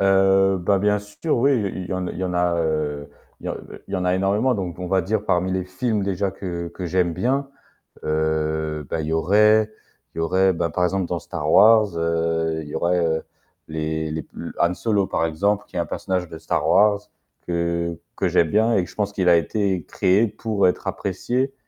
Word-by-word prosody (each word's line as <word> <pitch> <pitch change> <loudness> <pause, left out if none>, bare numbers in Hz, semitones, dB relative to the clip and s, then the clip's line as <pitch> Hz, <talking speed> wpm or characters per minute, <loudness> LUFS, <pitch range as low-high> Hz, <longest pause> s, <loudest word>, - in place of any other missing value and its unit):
Heu, 95 0 +4
bah, 95 +3 +2
bien 105 +1 +2
sûr 105 +10 -3
oui, 140 +4 +4
il 105 -6 -1
il - - -10
y - - 0
en 95 0 -2
il - - -5
y 95 - -2
en 90 - -2
a, 90 0 +2
heu, 75 -3 -2 0.3
il - - -8
y - - -1
en - - -2 0.3
il - - -9
y - - +1
en 90 - -2
a 90 0 +2
énormément 100 +7 +1
donc, 90 -5 -4
on 90 - -4
va 95 0 +2
dire, 105 +3 -1
parmi 90 -1 +1
les 95 -1 -1
films 105 +4 -1
déjà 100 0 -1
que 90 -3 -5
que 90 +1 -6
j'aime 85 0 +1
bien, 135 - 0 0.6
heu, 80 0 -1
bah, 80 - -2
il 75 - -4
y 80 - -1
aurait 105 +6 +4 0.4
il - - -12
y - - +1
aurait, 95 +3 +3
bah, 85 0 -1
par 90 +4 -1
exemple 95 0 0
dans 85 -1 -2
Star 75 -4 -4
Wars, 105 -3 +6
heu, 80 -1 0
il - - -10
y - - -6
aurait 85 -2 +1 0.4
les 80 0 -3
les 80 0 -4
p - - -28
l - - -6
Han 85 +1 +3
Solo 100 -1 0
par 80 - 0
exemple 100 +6 0
qui - - -8
est - - +1
un 85 - 0
personnage 95 -2 -2
de 80 - -9
Star - - -1
Wars 105 0 +4 0.5
que 85 -1 -1 0.2
que - - +1
j'aime 85 - +2
bien 110 +6 +3
et 95 - +2
que - - -8
je - - -15
pense 100 -1 -1
qu'il 95 -3 +2
a 85 - +7
été 95 0 0
créé 95 +5 +2
pour 105 -2 0
être 90 - -1
apprécié 125 +8 -2
90 Hz, 225 wpm, -22 LUFS, 85-100 Hz, 0.6 s, a